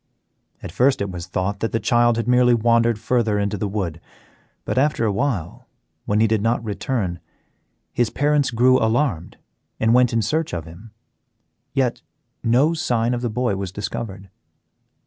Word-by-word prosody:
At - - -6
first 130 +8 +2
it 100 -1 -3
was 90 -1 -7
thought 100 +2 -2
that 115 - -2
the 115 - +1
child 120 -1 +2
had 115 -1 -2
merely 125 0 +4
wandered 115 0 +2
further 110 -1 0
into 100 0 -1
the 105 +1 -2
wood, 95 -5 -4 0.6
but - - -2
after 145 -4 +1
a 105 - +1
while, 100 - -3 0.4
when 105 +1 +1
he 110 - +4
did 110 -1 +1
not 115 +2 0
return, 105 -3 -2 0.7
his 120 -2 +1
parents 145 +1 +1
grew 125 +2 +4
alarmed 110 - 0 0.4
and 110 +1 +3
went 125 -1 +4
in 115 -1 +1
search 155 - -1
of 85 -2 -5
him. 85 +7 -13 0.8
Yet 130 -3 0 0.4
no 130 +8 +3
sign 120 -7 0
of 120 - -2
the 120 - -1
boy 120 -1 -1
was 95 -2 -4
discovered. 100 -1 -6
115 Hz, 165 wpm, -21 LUFS, 100-125 Hz, 0.8 s, merely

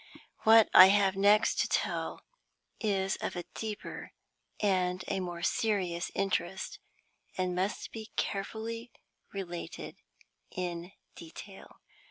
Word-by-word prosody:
What 220 0 +8
I 185 - +11
have 195 -1 +3
next 205 +3 +4
to - - 0
tell - - -2 0.6
is 195 -3 0
of - - -4
a 175 - -3
deeper 215 -2 -6 0.5
and 185 -3 +1
a 195 - -1
more 175 -2 -5
serious 185 -6 0
interest, 190 -1 -2 0.6
and 185 -1 0
must 185 +3 -2
be 220 -1 -8
carefully 225 +4 -3 0.4
related 175 -3 -6 0.5
in 175 0 -5 0.2
detail. 190 +4 -12
195 Hz, 110 wpm, -31 LUFS, 180-210 Hz, 0.6 s, I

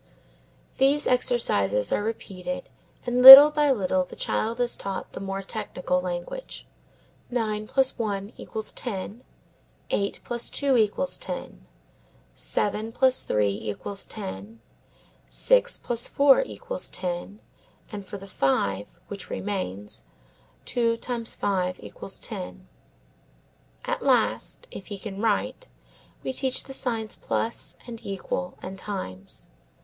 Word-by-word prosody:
These 280 +2 +3
exercises 105 - +1
are - - +1
repeated 225 +4 -5 0.4
and 245 0 0
little 270 +3 +14
by 295 -1 +2
little 185 -6 +1
the - - -11
child 230 +2 -2
is 245 -1 +1
taught 195 -1 -5
the - - -8
more 195 0 -4
technical 180 -3 -2
language; 180 - -6 0.6
nine 215 -3 -2
plus 265 0 +1
one 205 -1 -3
equals 220 -1 -5
ten, 215 0 -5 0.7
eight 200 0 -1
plus 240 -1 -1
two 280 -2 0
equals 225 +4 +1
ten, - - -7 0.7
seven 215 +2 -2
plus 260 +2 +3
three 105 -1 +1
equals 150 - -4
ten, 210 +2 -8 0.7
six - - +2
plus 240 -1 -1
four 280 - +5
equals - - -4
ten, 180 +3 -5 0.5
and 205 -2 -6
for 195 +2 -8
the 195 - -11
five, 105 - -1
which 200 -1 -8
remains, 105 - -5 0.6
two 230 -2 0
times 235 -2 -3
five 185 -2 -1
equals 105 - -7
ten. 65 -9 -6 1.2
At - - -2
last, - - 0
if 195 - -9
he 205 - -6
can 195 0 -7
write, 225 - -1 0.6
we 260 - -3
teach 260 -1 0
the 270 - -9
signs 225 -5 -2
plus 230 - -3
and 235 -2 -9
equals 185 -2 -4
and 190 +1 -7
times. 95 - -7
210 Hz, 125 wpm, -25 LUFS, 185-245 Hz, 1.2 s, little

